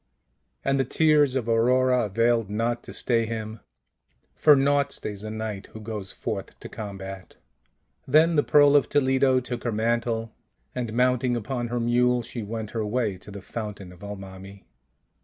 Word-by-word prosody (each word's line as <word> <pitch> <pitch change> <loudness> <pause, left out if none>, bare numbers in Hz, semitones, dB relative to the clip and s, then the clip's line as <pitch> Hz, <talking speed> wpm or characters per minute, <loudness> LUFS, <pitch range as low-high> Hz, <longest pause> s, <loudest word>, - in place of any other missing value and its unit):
And 135 0 +2
the - - +3
tears 150 0 +3
of 125 -4 -1
Aurora 125 +2 +3
availed 115 +1 +1
not 115 +3 -1
to - - -9
stay 115 -2 0
him; 110 -1 -5 0.7
for 150 -2 +6
naught 140 +1 +2
stays 105 -5 -6
a 110 - -5
knight 110 -2 -5
who 110 - -8
goes 105 -3 -6
forth - - -5
to - - -9
combat. 95 -3 -8 0.7
Then 160 +5 +4
the 145 - +5
Pearl 145 0 +5
of 145 - +4
Toledo 130 -2 +3
took 125 -1 -6
her 120 - -1
mantle, 115 +1 -1 0.4
and 120 -3 -3
mounting 125 0 +2
upon 120 +1 -3
her 120 +1 -2
mule 120 +1 +2
she 120 - -6
went 110 0 -5
her 115 -2 -2
way 105 -1 -1
to 100 - -12
the 100 -1 -9
fountain 105 -3 -6
of 90 - -17
Almami. 95 -1 -9
115 Hz, 165 wpm, -25 LUFS, 105-130 Hz, 0.7 s, for